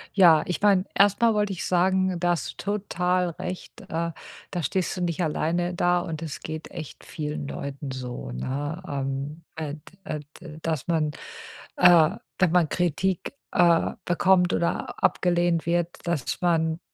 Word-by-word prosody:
Ja, 170 -6 +7
ich 180 - -3
meine, 200 -2 +4
erstmal 205 +3 +4
wollte 210 -2 +1
ich 180 - -4
sagen: 185 0 +2
Da 175 0 +1
hast 170 -5 -2
du - - -36 0.2
total 180 -3 0
recht, 180 +2 -7
äh, - - -16 0.6
da 175 - -2
stehst 185 +6 -1
du - - -3
nicht 175 0 -1
alleine 175 +2 0
da 175 0 +3
und 165 -3 -5
das 155 -3 -5
geht 155 0 -6
echt 165 -5 -8
vielen 150 - -4
Leuten 135 - -5
so, 125 - -6
ne? 145 - -3
Ähm, 140 +3 -4
äh 155 -2 -4
d 150 - -15 0.2
äh, 150 - -3 0.2
d 160 -4 -9
dass 160 -2 -2
man 155 -3 +1 0.6
äh, - - -62
dass 170 -3 +7
man, - - -36 0.2
wenn 180 -3 +4
man 175 -4 +3
Kritik, 180 - 0 0.2
äh, 170 -2 +4
bekommt 180 +1 +3
oder 170 - -1
abgelehnt 175 -2 +2
wird, 170 0 +1 0.2
dass 170 0 -1
man 160 -2 +1
170 Hz, 165 wpm, -26 LUFS, 155-180 Hz, 0.6 s, Ja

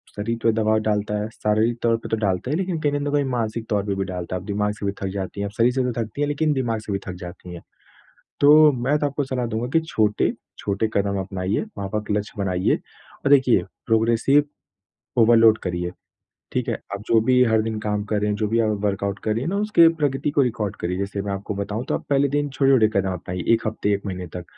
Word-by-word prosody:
शरीर 115 +3 -2
पे 115 - +4
दबाव 110 0 +2
डालता 105 -1 -1
है, 105 - -2
शारीरिक 110 +2 0
तौर 115 -1 +3
पे - - -9
तो 110 - 0
डालता 100 +3 -1
है, 155 - +1
लेकिन 185 -3 -2
कहीं 145 - +1
न 145 0 -1
कहीं 145 -1 +2
मानसिक 115 -2 -2
तौर 100 -2 +1
पे 100 -1 -1
भी 95 - -1
डालता 90 -1 -5
है। - - -2
अब 95 - -13
दिमाग 105 0 0
से 105 - -7
भी 100 - +1
थक 95 - -1
जाती 95 0 -5
हैं, 100 - -1
आप - - -8
शरीर 120 +2 +4
से 130 - +1
तो 125 - 0
थकती 115 +6 -5
हैं, 145 - +2
लेकिन 150 +1 +1
दिमाग 120 -5 -1
से 105 -1 -5
भी 95 - -1
थक 90 - -5
जाती 90 0 -9
हैं। 85 - -9 0.8
तो 150 +1 +8
मैं 135 +4 0
तो - - 0
आपको 145 +1 -2
सलाह 130 -2 -2
दूँगा 115 +2 -2
कि 165 - +5
छोटे-छोटे 105 -1 -1
कदम 100 0 0
अपनाइए, 95 +1 -2 0.2
वहाँ 100 -1 -4
पे 105 - -2
आप 105 0 -4
लक्ष्य 105 0 -2
बनाइए 95 -2 +1
और - - -8
देखिए, 130 -9 +5 0.2
प्रोग्रेसिव 115 +6 +3 0.8
ओवरलोड 115 -1 +6
करिए। 90 -1 -3 0.6
ठीक - - -1
है? - - +1 0.2
आप 100 - -5
जो 115 -1 +5
भी 125 +2 +4
हर 110 -2 +2
दिन 110 -1 -3
काम 105 -1 -1
कर 105 -1 +1
रहे 105 - 0
हैं, 105 - -1
जो 110 - -1
भी 115 +2 +1
आप 110 -1 +2
वर्कआउट 100 0 -1
कर 110 - +1
रही 115 - -1
हैं 150 - -2
ना 195 - -1
उसके 205 -5 +5
प्रगति 145 -1 0
को 145 -1 +3
रिकॉर्ड 110 -6 -2
करिए, 90 +2 -2
जैसे 100 0 -3
मैं 100 -1 -3
आपको 100 +1 -4
बताऊँ 100 +4 -3
तो - - -1
आप - - -3
पहले 140 0 +3
दिन 145 0 +1
छोटे-छोटे 135 -5 +4
कदम 95 -1 -2
अपनाइए, 90 0 -5
1 115 - -2
हफ्ते 105 -1 -1
1 100 - -4
महीने 90 -2 -4
तक। 90 - -6
110 Hz, 245 wpm, -23 LUFS, 100-125 Hz, 0.8 s, तो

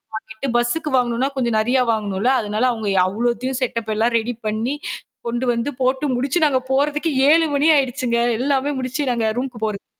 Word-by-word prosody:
வாங்கிட்டு 220 +4 -6
பஸ்க்கு 300 +6 0
வாங்கணும்னா 245 +2 +1
கொஞ்சம் 235 -4 0
நிறைய 245 +4 +2
வாங்கணும்ல. 210 +1 -1
அதனால 210 +3 -2
அவங்க 220 -3 -4 0.2
அவ்வளவையும் 240 +5 -1
செட்டப் 230 -3 -2
எல்லாம் 230 +2 +1
ரெடி 240 +2 -3
பண்ணி 220 +6 -1 0.5
கொண்டு 240 +2 -2
வந்து 235 +4 -2
போட்டு 260 +3 +1
முடிச்சு 270 +7 0
நாங்க 265 -3 +2
போறதுக்கு 300 +4 +1 0.2
7 325 +1 +5
மணி 290 +3 +3
ஆயிடுச்சுங்க. 255 -3 0 0.2
எல்லாமே 275 +1 +1
முடிச்சு 260 +3 -2
நாங்க 235 -2 0
ரூம் 260 0 -2
போறதுக்கு. 205 -2 -4
245 Hz, 160 wpm, -20 LUFS, 225-270 Hz, 0.5 s, 7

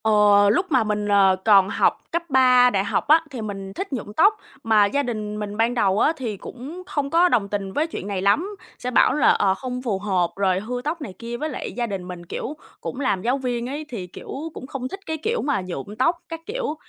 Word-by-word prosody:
Ờ, 205 -2 +5
lúc 360 - +1
mà 255 -5 +4
mình, 210 -1 -1
ờ, 195 -2 +5
còn 200 -3 +6
học - - +2
cấp 340 - 0
3, 250 -2 +6
đại 195 -5 +1
học 200 - -1
á, 315 +3 +6
thì 250 -4 -5
mình 195 -2 -6
thích 340 - -5
nhuộm 210 -4 -5
tóc. 420 +1 +5 0.3
Mà 220 -2 +5
gia 280 +8 0
đình 215 -4 -4
mình 210 0 -5
ban 230 +2 +2
đầu 200 -4 +2
á 310 - +3
thì 225 -6 -4
cũng 280 - -9
không 290 -8 -2
có 345 +4 +4
đồng 220 -8 +2
tình 195 -2 -3
với 305 +3 +1
chuyện 255 - -6
này 195 -2 -2
lắm, 205 - +2 0.3
sẽ 250 - -3
bảo 235 - +4
là, 295 - +4
ờ, 195 -2 +3
không 250 +3 -5
phù 220 -7 -1
hợp 190 -4 +1
rồi 190 -2 +1
hư 245 +5 -4
tóc 315 +2 -3
này 205 -10 -6
kia. 235 +1 -5
Với 310 +5 -3
lại - - -5
gia 240 - -2
đình 190 -4 -5
mình, 175 -1 -8
kiểu, 275 - -5 0.3
cũng 265 - -5
làm 255 -9 0
giáo 245 +6 +1
viên 245 -2 -3
ấy 295 +3 -5
thì, 195 -7 -6
kiểu, 180 - -11 0.2
cũng 260 - -8
không 260 -2 -4
thích 390 - -7
cái 320 - -3
kiểu 470 +2 0
mà 280 -8 0
nhuộm 185 +2 -6
tóc 335 +6 +3
các 330 0 -5
kiểu. 445 -7 -3
235 Hz, 245 wpm, -23 LUFS, 200-280 Hz, 0.3 s, còn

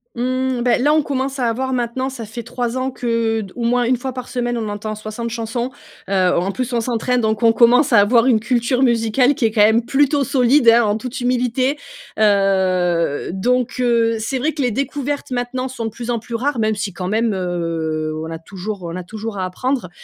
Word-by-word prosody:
Mmh, 255 +1 -1
beh, 245 0 +2
là, 290 +4 +3
on 310 - +3
commence 270 -1 -2
à 250 -3 0
avoir 260 +3 -1
maintenant 255 +1 -1
ça 250 -4 -7
fait 220 +3 -7
3 245 +1 -3
ans 260 +1 -1
que, 230 -3 -1
heu, - - -6
au 240 - -4
moins, 245 +1 +2
1 245 +2 +2
fois 260 +2 -4
par 255 -1 -7
semaine, 240 -1 -2
on 220 -2 -3
entend 210 +1 -4
60 215 +2 -5
chansons. 235 +1 -3 0.4
Heu, 185 -2 +2
en 180 +3 0
plus, 255 +3 -4
on 235 - +1
s'entraîne. 245 +1 0
Donc, 220 +1 0
on 225 -1 +6
commence 240 +4 +4
à 220 - +8
avoir 230 +3 +4
une 245 -4 +4
culture 245 +2 0
musicale 245 +2 +3
qui 240 - 0
est, 220 - +2
quand 215 -1 +2
même, 220 +3 +4
plutôt 280 +3 +2
solide, 265 0 +3
hein, 235 +1 +6
en 210 -1 +1
toute 250 +3 -6
humilité. 250 +3 0 0.4
Heu, 185 -6 +2
donc 250 +6 0
heu, 230 -2 +2
c'est 255 +4 -2
vrai 305 +5 0
que 290 - -2
les 245 - +1
découvertes, 280 +3 -3
maintenant, 255 +1 -2
sont 250 -3 -5
de 225 - -3
plus 235 +2 -7
en 240 - +1
plus 235 +1 -9
rares, 260 +4 -1
même 220 -1 +1
si, 205 0 -3
quand 180 +1 -5
même, 220 +2 +1
heu, 165 -4 -2
on 160 - -6
a 165 - -6
toujours 195 +4 -7
on 170 0 -5
a 185 - -5
toujours 215 +3 -6
à 185 - -1
apprendre. 240 +3 -2
235 Hz, 225 wpm, -19 LUFS, 215-255 Hz, 0.4 s, à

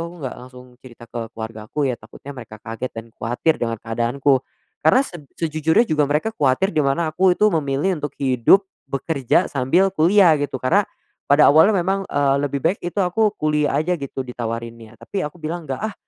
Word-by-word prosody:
nggak 165 -5 -6
langsung 125 0 -13
cerita 120 -2 -13
ke 115 -1 -6
keluargaku 110 +5 -4
ya, - - 0
takutnya 130 +6 -11
mereka 115 -4 -10
kaget 115 +3 -4
dan 115 0 -6
kuatir 120 +8 0
dengan 115 -1 -1
keadaanku. 125 +5 0 0.4
Karena 160 - +5
sej 175 - -10 0.2
sejujurnya 160 +6 +2
juga 150 -1 +2
mereka 155 +10 0
kuatir 150 +6 +1
di 155 - +3
mana 155 +3 0
aku 180 +1 +3
itu - - +2
memilih 155 +3 0
untuk 145 -1 -3
hidup 135 - +4 0.2
bekerja 135 -1 0
sambil 170 +9 +2
kuliah 180 +1 +5
gitu, 140 -2 -2
karena 165 +12 +3 0.5
pada 145 +1 +6
awalnya 180 +8 +6
memang, 190 +2 0
eee, 140 -1 +2
lebih 140 -1 -2
baik 205 - -11
itu 175 +4 -4
aku 210 +4 +1
kuliah 150 -2 0
aja 170 +4 0
gitu 135 -1 -5
ditawarinnya, 115 -1 -6
tapi 195 - -5
aku 150 - -9
bilang, 165 +1 -4
"Nggak 135 - -3
ah." 220 -2 -3
145 Hz, 180 wpm, -21 LUFS, 125-170 Hz, 0.5 s, pada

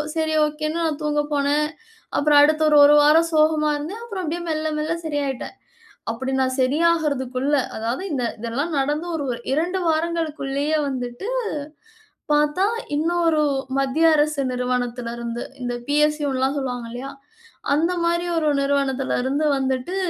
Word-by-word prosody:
சரி 315 -1 0
ஓகேன்னு 305 +2 -3
நான் 310 -1 -2
தூங்க 295 0 +1
போனேன். 290 +1 +1 0.5
அப்புறம் 295 0 +5
அடுத்த 310 +1 +3
ஒரு 300 - +5
1 295 - +6
வாரம் 325 +3 +5
சோகமா 310 0 +3
இருந்தேன். 365 +10 -6
அப்புறம் 405 -6 -5
அப்டியே 345 +2 -3
மெல்ல 315 0 -1
மெல்ல 310 +2 -1
சரியாயிட்டேன். 290 +1 -3 0.6
அப்டி 260 +3 -4
நான் 260 0 0
சரியாகறதுக்குள்ள 285 -2 +1 0.2
அதாவது, 235 +10 -3
இந்த 250 -3 -1 0.2
இதெல்லாம் 275 +8 -2
நடந்து 295 +5 -1
ஒரு 285 - -3 0.3
2 350 +5 0
வாரங்களுக்குள்ளயே 310 -3 -1
வந்துட்டு 250 - -4 1.0
பார்த்தா 300 +6 +2 0.3
இன்னொரு 330 0 +2 0.3
மத்திய 275 +5 +3
அரசு 300 -1 +1
நிறுவனத்தில 245 -1 -2
இருந்து 235 0 -4 0.2
இந்த 245 0 -2
பிஎஸ்யூனுலாம் 290 -2 +1
சொல்லுவாங்க 250 -3 -3
இல்லையா? 255 +3 -6 0.7
அந்த 335 +4 +1
மாரி 340 +1 +1
ஒரு 310 -2 +1
நிறுவனத்தில 275 -1 0
இருந்து 280 +4 0
வந்துட்டு 265 +7 -2
295 Hz, 130 wpm, -22 LUFS, 265-315 Hz, 1.0 s, 1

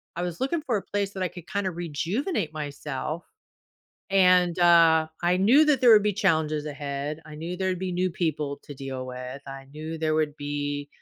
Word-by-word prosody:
I 170 - -3
was 175 -2 -4
looking 310 +5 0
for 250 -8 0
a - - -4
place 200 -1 -2
that 190 - -3
I - - +1
could 175 -1 -11
kinda 200 -2 -1
rejuvenate 175 - -2
myself, 150 +2 -5 0.9
and, 180 -2 +4
uh, 165 -2 +6 0.2
I 175 +1 +3
knew 235 +11 +5
that 295 -3 +3
there 240 -2 +8
would 210 -2 +7
be 210 0 +1
challenges 155 -6 +1
ahead, 145 +1 -4
I 155 - -10
knew 170 +3 -5
there'd 185 -1 -1
be 185 0 -3
new 180 +1 0
people 155 -5 -2
to 145 - -9
deal 135 -1 -5
with, 125 +2 -7
I 135 0 -8
knew 155 +2 -6
there 155 -1 0
would 155 -1 0
be, 145 -1 -3
165 Hz, 195 wpm, -26 LUFS, 145-185 Hz, 0.9 s, there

